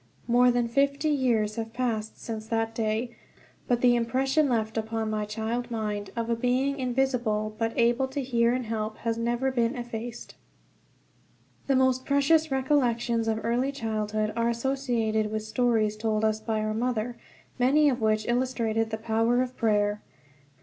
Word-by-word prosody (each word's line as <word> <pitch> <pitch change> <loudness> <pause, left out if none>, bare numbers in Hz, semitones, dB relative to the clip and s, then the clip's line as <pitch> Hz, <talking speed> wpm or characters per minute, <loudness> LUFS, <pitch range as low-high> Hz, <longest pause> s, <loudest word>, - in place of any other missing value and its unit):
More 245 +1 +5
than 240 -1 +1
fifty 280 +5 +1
years 235 -7 +1
have 225 0 -4
passed 225 -4 -2
since 220 -1 -6
that 225 0 -1
day, 225 +2 -2 0.5
but 245 -1 +1
the 245 -1 +5
impression 265 +5 +1
left 220 -3 0
upon 220 0 -2
my 215 -1 -1
child 225 +3 -3
mind, 210 -3 -3
of 230 -1 -2
a 235 - +1
Being 255 +4 0
invisible 245 -4 0
but 225 0 -1
able 240 +3 +3
to 270 +1 -4
hear 235 -2 +2
and 250 0 -1
help, 215 -1 -3
has 230 0 +1
never 240 +3 0
been 235 -1 0
effaced. 240 -1 -6 1.3
The 275 - +3
most 260 0 +2
precious 305 +3 +3
recollections 245 -4 +1
of 220 0 -1
early 245 +4 +1
childhood 215 -4 -2
are 230 0 +1
associated 235 -3 0
with 215 0 -2
stories 220 -2 +1
told 215 0 0
us 215 0 +1
by 220 0 -2
our 215 0 -1
mother, 240 0 -1 0.4
many 285 +5 +4
of 255 -4 +1
which 215 0 +1
illustrated 235 -3 0
the 220 - -3
power 225 +2 +1
of 255 0 -7
prayer. 210 -2 +1
235 Hz, 160 wpm, -27 LUFS, 220-255 Hz, 1.3 s, More